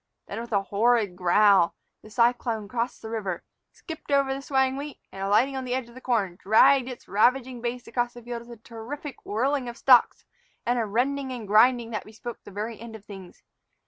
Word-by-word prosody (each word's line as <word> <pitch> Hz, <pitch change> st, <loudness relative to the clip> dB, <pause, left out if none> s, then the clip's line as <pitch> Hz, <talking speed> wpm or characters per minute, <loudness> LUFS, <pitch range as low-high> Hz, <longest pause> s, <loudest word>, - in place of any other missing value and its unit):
Then, 215 Hz, +3 st, -5 dB
with 235 Hz, -, -9 dB
a 200 Hz, -2 st, +2 dB
horrid 210 Hz, -1 st, +2 dB
growl, 185 Hz, 0 st, +4 dB, 0.3 s
the 215 Hz, -, -14 dB
cyclone 235 Hz, -2 st, +1 dB
crossed 235 Hz, +2 st, -3 dB
the 220 Hz, -, -6 dB
river, 195 Hz, -6 st, -3 dB, 0.3 s
skipped 320 Hz, -3 st, -10 dB
over 275 Hz, -1 st, +3 dB
the 270 Hz, -, -5 dB
swaying 265 Hz, -1 st, +1 dB
wheat, 285 Hz, +1 st, -6 dB
and, 195 Hz, -, -8 dB
alighting 215 Hz, +8 st, +2 dB
on 265 Hz, -, -3 dB
the 250 Hz, 0 st, -2 dB
edge 255 Hz, -2 st, -4 dB
of -, -, -15 dB
the 255 Hz, -, -12 dB
corn, 205 Hz, -9 st, 0 dB
dragged 260 Hz, +5 st, +5 dB
its 250 Hz, -, -9 dB
ravaging 245 Hz, +3 st, +2 dB
base 245 Hz, 0 st, -4 dB
across 240 Hz, 0 st, -2 dB
the 240 Hz, -, -11 dB
field 235 Hz, 0 st, -6 dB
with 235 Hz, -2 st, -11 dB
a -, -, -42 dB
terrific 255 Hz, +5 st, -8 dB
whirling 255 Hz, +4 st, 0 dB
of 235 Hz, -, -9 dB
stalks 250 Hz, -3 st, +4 dB, 0.4 s
and 245 Hz, +1 st, +1 dB
a 225 Hz, -, 0 dB
rending 260 Hz, +5 st, -1 dB
and 235 Hz, -5 st, -6 dB
grinding 235 Hz, +3 st, +4 dB
that 215 Hz, -, -3 dB
bespoke 230 Hz, +2 st, -9 dB
the -, -, -11 dB
very 210 Hz, +3 st, -5 dB
end 230 Hz, -1 st, -9 dB
of 210 Hz, -2 st, -12 dB
things. 190 Hz, -3 st, -12 dB
235 Hz, 210 wpm, -26 LUFS, 215-255 Hz, 0.4 s, dragged